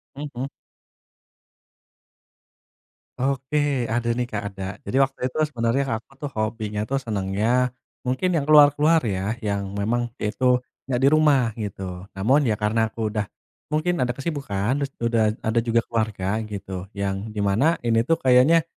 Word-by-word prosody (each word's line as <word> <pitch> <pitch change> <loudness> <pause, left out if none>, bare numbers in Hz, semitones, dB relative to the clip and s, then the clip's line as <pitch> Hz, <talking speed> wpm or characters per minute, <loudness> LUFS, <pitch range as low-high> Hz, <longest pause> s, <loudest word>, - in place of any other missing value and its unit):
Mhm. 140 -3 -5 2.7
Oke, 135 +2 -1 0.3
ada 120 0 0
nih, 125 - 0
Kak, 105 - -3
ada. 95 -1 -7 0.2
Jadi - - -3
waktu 135 0 -3
itu 130 - -8
sebenarnya 120 +1 +1 0.2
aku 120 - -30
tuh 145 - -3
hobinya 110 -1 -2
tuh 135 - -1
senangnya, 100 0 -1 0.6
mungkin 130 +9 +1
yang 145 -3 +1
keluar-keluar 150 +2 +6
ya, 100 0 -1
yang 100 -1 -1
memang 120 +4 0
itu 105 +5 -2 0.4
nggak 125 -2 0
di 135 - +7
rumah 145 -6 +4
gitu. 95 -2 -5
Namun, 130 +9 +3
ya 110 - +2
karena 110 +2 +1
aku 110 0 -3
udah 105 -1 -1 0.5
mungkin 155 +4 0
ada 125 -2 0
kesibukan, 135 -8 -2
terus 140 -1 -2
udah 115 -1 +2 0.2
ada 110 +1 +2
juga 115 0 +3
keluarga 110 -4 -1 0.3
gitu, 100 -1 -6 0.2
yang 100 -1 -1 0.2
di - - -3
mana 120 +12 +3
ini 115 -1 +3
tuh 165 - +4
kayaknya 130 +6 +5
115 Hz, 145 wpm, -24 LUFS, 105-140 Hz, 2.7 s, di